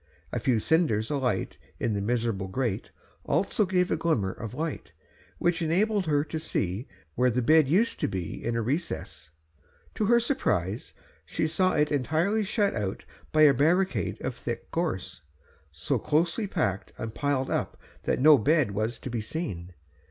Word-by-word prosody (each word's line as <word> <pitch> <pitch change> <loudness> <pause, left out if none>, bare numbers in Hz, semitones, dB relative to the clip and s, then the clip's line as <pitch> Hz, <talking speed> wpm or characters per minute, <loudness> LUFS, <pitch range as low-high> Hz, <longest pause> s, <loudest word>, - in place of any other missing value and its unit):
A - - -1
few 125 -4 +2
cinders 115 -5 +1
alight 125 -9 -1 0.2
in 115 - 0
the 100 - -1
miserable 115 -3 -1
grate 115 0 -2 0.3
also 200 +1 +1
gave 180 -1 +1
a - - +3
glimmer 120 - 0
of 115 +3 -7
light, 160 0 -4 0.4
which 175 0 +1
enabled 190 +4 +1
her 145 -2 +2
to 160 +1 -4
see 105 - -2 0.3
where 125 +6 +3
the 125 +1 0
bed 155 +2 +5
used 205 +9 +2
to - - +1
be, 90 -4 -5
in 115 0 -1
a 115 - 0
recess. 145 - -3 0.6
To 215 - -1
her 235 +3 +5
surprise 115 - -1 0.3
she - - -2
saw 185 +4 +2
it 150 0 +2
entirely 160 - +1
shut 205 0 +1
out 105 -4 -3 0.3
by 155 0 +5
a 145 -2 +8
barricade 175 +8 +1
of 130 - -2
thick 120 -1 -6
gorse, 160 - -3 0.5
so - - -1
closely 170 +8 +1
packed 100 - -2
and 110 -1 -5
piled 140 -1 -1
up - - -2 0.3
that - - +1
no 150 +1 +7
bed 145 0 +3
was 110 +4 -2
to 130 - -7
be 115 -2 -2
seen. 105 - -4
145 Hz, 165 wpm, -27 LUFS, 110-170 Hz, 0.6 s, a